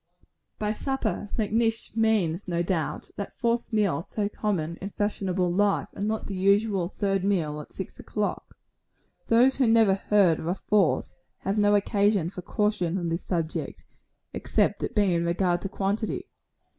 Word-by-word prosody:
By 210 0 -1
supper, 225 -3 -2
Macnish 225 +1 0
means, 205 -6 +1
no 170 -1 0
doubt, 170 -4 -2
that 200 - -6
fourth 235 0 0
meal 200 -9 +1
so 205 +4 -2
common 175 -7 -2
in 195 - -6
fashionable 190 -4 -1
life, 205 +1 +1
and 205 - -3
not 220 0 -2
the 200 - -5
usual 195 -1 +2
third 195 -2 -1
meal 160 -7 0
at - - -14
six 190 - -7
o'clock 210 -1 -3 0.7
Those 245 +4 +4
who 260 -3 +3
never 225 -3 +5
heard 195 -4 +3
of 160 - -5
a 175 - 0
fourth, 195 - +1 0.2
have 195 +3 -1
no 205 0 +4
occasion 200 -3 +2
for 185 - -7
caution 190 -3 0
on 170 -2 -2
this 165 +2 -2
subject, 165 -3 -3 0.5
except - - 0
it - - -3
be 200 -4 +3
in 170 0 +1
regard 175 +1 +1
to 195 - -4
quantity. 210 - -2
200 Hz, 160 wpm, -26 LUFS, 175-215 Hz, 0.7 s, never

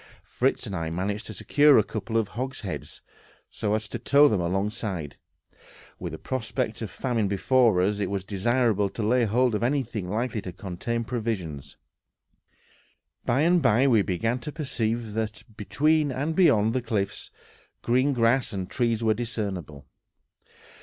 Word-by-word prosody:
Fritz 130 +1 0
and 100 -4 -5
I 80 -2 -2
managed 100 +6 -3
to 110 - -7
secure 145 +8 +5
a 110 - +5
couple 110 +2 -3
of 110 -3 0
hogsheads, 125 -5 -6 0.5
so 105 0 -1
as 110 0 -3
to 120 - -5
tow 140 +4 +5
them 105 -9 +1
alongside. 95 -3 -2 0.8
With - - -5
the - - -5
prospect 120 -2 -3
of 110 - -4
famine 115 -1 -1
before 100 0 +3
us, 100 +2 0
it 100 -3 -1
was 100 -2 -2
desirable 105 +1 +1
to 110 - -5
lay 120 +3 +3
hold 120 +3 +2
of 105 - -1
anything 120 -7 -1
likely 115 +1 -2
to 90 - -7
contain 100 +6 -4
provisions. 95 - -4 1.5
By 130 +4 +2
and 175 +2 +4
by 125 0 +4
we 115 -6 +5
began 115 +7 -1
to 150 +5 -6
perceive 115 -7 -2
that, 110 -1 -3
between 145 +9 +1
and 145 +5 -2
beyond 115 - +4
the 130 - 0
cliffs, 105 -4 -2 0.5
green 130 +4 +2
grass 120 -1 +2
and 95 -3 -4
trees 115 -2 0
were 110 -1 +3
discernible. 100 - -4
110 Hz, 155 wpm, -26 LUFS, 100-125 Hz, 1.5 s, secure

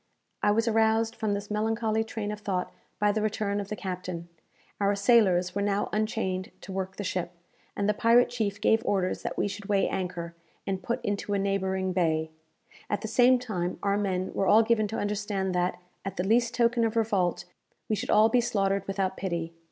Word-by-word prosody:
I 210 - +3
was 225 +3 +2
aroused 225 0 +2
from 215 -2 -1
this 205 +1 -6
melancholy 220 +1 0
train 220 -2 -4
of 210 - -5
thought 190 -3 -2 0.2
by 210 0 +3
the 215 +1 -1
return 210 -1 -1
of 200 - -4
the 210 - -4
captain. 180 -2 -5 0.5
Our 200 0 +2
sailors 200 -5 +4
were 200 - -1
now 200 0 0
unchained 210 -4 -1
to 195 - -9
work 190 0 -3
the 205 - -5
ship, 180 -2 -3 0.4
and 200 - 0
the 210 - +3
pirate 235 +3 +4
chief 215 -4 -2
gave 225 0 +3
orders 185 -2 0
that - - -4
we - - +1
should 200 0 -7
weigh 200 -2 +2
anchor, 175 -3 -4 0.3
and 190 -1 -2
put 235 +6 -3
into 205 0 -1
a - - +2
neighbouring 190 -1 0
bay. 160 -3 +1 0.6
At 205 - -1
the - - -4
same 245 +3 +5
time 185 -8 -3
our 200 0 +2
men 190 -2 -1
were 195 - 0
all 220 +2 +6
given 220 -1 +2
to 220 - -4
understand 205 -2 -1
that, 180 0 0 0.2
at 195 - -5
the 180 - 0
least 235 +3 +2
token 235 0 +3
of 225 0 0
revolt, 195 -6 +1 0.4
we 215 - +1
should - - -5
all 215 +1 +6
be 240 +2 +3
slaughtered 200 -4 0
without 195 -1 -1
pity. 170 -3 -3
205 Hz, 200 wpm, -28 LUFS, 190-220 Hz, 0.6 s, all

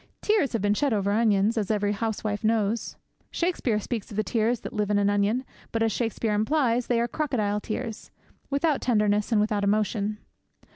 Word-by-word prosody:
Tears 420 -12 +2
have 225 -4 -1
been 205 0 +3
shed 275 +4 +1
over 200 -1 +1
onions, 215 0 +2
as 205 - -3
every 205 -1 +1
housewife 210 0 -2
knows. 220 0 0 0.3
Shakespeare 335 -11 0
speaks 220 0 -4
of 205 - -8
the 215 - +2
tears 230 +2 0
that - - -7
live 210 -1 -1
in 205 - +2
an 205 0 +3
onion. 205 +6 +1 0.3
But, 225 0 0
as 225 - +2
Shakespeare 225 -1 -1
implies, 240 +2 +1
they 240 -2 +2
are 235 - +1
crocodile 225 -7 -1
tears 225 0 -5 0.4
without 285 +1 +1
tenderness 210 -2 +1
and 220 - +4
without 210 -1 +1
emotion. 210 0 0
215 Hz, 185 wpm, -26 LUFS, 205-240 Hz, 0.4 s, and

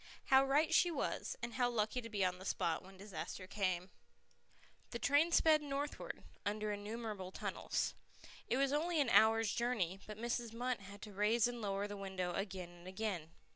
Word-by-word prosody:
How 265 0 +8
right 295 +4 +3
she 350 - +6
was, 310 -5 -2
and 240 0 -3
how 245 0 +2
lucky 230 +1 0
to 230 - -8
be 205 -3 +1
on 180 0 -1
the - - -9
spot 170 -3 0
when 190 0 -14
the 195 - -10
disaster 195 -2 -6
came! 185 -2 -1 1.0
The 235 - -3
train 290 +7 +4
sped 315 -2 +6
northward, 285 0 -4 0.2
under 210 +1 -1
innumerable 205 -2 -4
tunnels. - - -2 0.5
It 245 - +1
was 275 0 +2
only 325 +2 +1
an 275 -5 +3
hour's 225 -1 +5
journey, 210 -7 0
but 210 -1 -7
Mrs. 235 0 -2
Munt 245 0 -1
had 200 +1 -11
to 210 - -8
raise 215 +4 +3
and 240 -1 -5
lower 200 -1 -1
the 205 0 -6
window 190 -2 -3
again 190 -2 -3
and 175 +1 -14
again. 190 -5 -3
215 Hz, 185 wpm, -37 LUFS, 195-250 Hz, 1.0 s, How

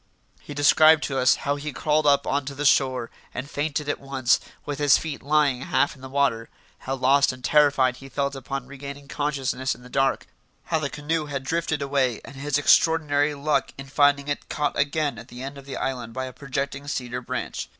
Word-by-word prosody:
He 145 - -9
described 155 +2 +6
to 135 -2 -1
us 130 0 +5
how 140 +1 +1
he 150 +1 -5
crawled 150 +1 +1
up 140 0 +4
on 140 0 0
to 140 0 -6
the 145 +2 -3
shore, 130 -3 +2 0.2
and 130 +3 -4
fainted 145 0 -2
at 145 - -1
once, 135 -2 +1 0.3
with 145 -1 -4
his 145 -2 +5
feet 155 -4 -5
lying 145 -3 +2
half 140 - +1
in 135 - -17
the 130 - -8
water; 130 -5 0 0.3
how 135 - -3
lost 135 +2 +3
and 130 0 -12
terrified 140 -4 +3
he 135 +1 -12
felt 140 0 -1
upon 135 0 -5
regaining 140 +1 -9
consciousness 140 -2 -2
in 125 - -17
the 125 - -12
dark; 135 0 +1 0.4
how 160 - 0
the 140 -2 -2
canoe 150 +2 -2
had 135 -2 -4
drifted 160 0 -1
away 135 -4 0
and 135 - -11
his 145 +1 -1
extraordinary 145 -1 +3
luck 145 +2 0
in 135 - -7
finding 145 0 +3
it 145 - -4
caught 145 -1 -1
again 145 0 0
at 115 - -11
the 125 +1 -9
end 135 +1 -6
of 140 0 -12
the 135 - -5
island 125 -3 -3
by 130 +1 -3
a 130 - -8
projecting 140 +1 -4
cedar 125 -3 -3
branch. - - -4
140 Hz, 210 wpm, -24 LUFS, 135-145 Hz, 0.4 s, described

